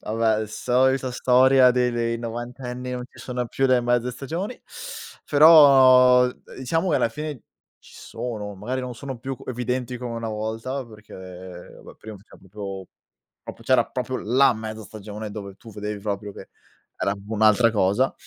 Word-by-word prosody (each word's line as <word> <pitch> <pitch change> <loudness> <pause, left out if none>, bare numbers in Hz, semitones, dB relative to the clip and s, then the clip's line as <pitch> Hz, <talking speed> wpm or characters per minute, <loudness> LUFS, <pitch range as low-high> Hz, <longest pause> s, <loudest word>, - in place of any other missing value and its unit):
Vabbè, 110 -1 0
solita 130 +4 +1
storia 130 +1 +5
dei 125 0 +1
dei 115 -1 -2
novantenni 125 +2 -6
"non 125 0 -4
ci - - -20
sono 125 -1 -4
più 135 +3 0
le 130 -1 +3
mezze 120 0 0
stagioni", 165 - -5 0.7
però 130 -5 +7 0.3
diciamo 165 +8 -1
che - - +3
alla - - +1
fine 150 -1 -6 0.4
ci - - -19
sono, 105 -4 -6
magari 125 +7 -4
non 125 -1 -6
sono 135 0 -7
più 130 +2 -5
evidenti 125 0 -3
come 120 -1 -6
una 115 -1 -4
volta 110 +5 -4
perché 95 -5 -12
va - - -13
prima 110 -1 -11
c'era 100 +3 -18
proprio 95 -1 -8 0.6
proprio - - -10
c'era - - +3
proprio 130 0 -4
la 130 +5 +3
mezza 110 0 -7
stagione 105 0 -8
dove 100 -2 -8
tu 115 +2 -14
vedevi 105 0 -5
proprio 100 0 -4
che - - -12 0.5
era 100 - -1
un'altra 110 +2 +4
cosa. 105 +5 +1
120 Hz, 155 wpm, -23 LUFS, 110-130 Hz, 0.7 s, però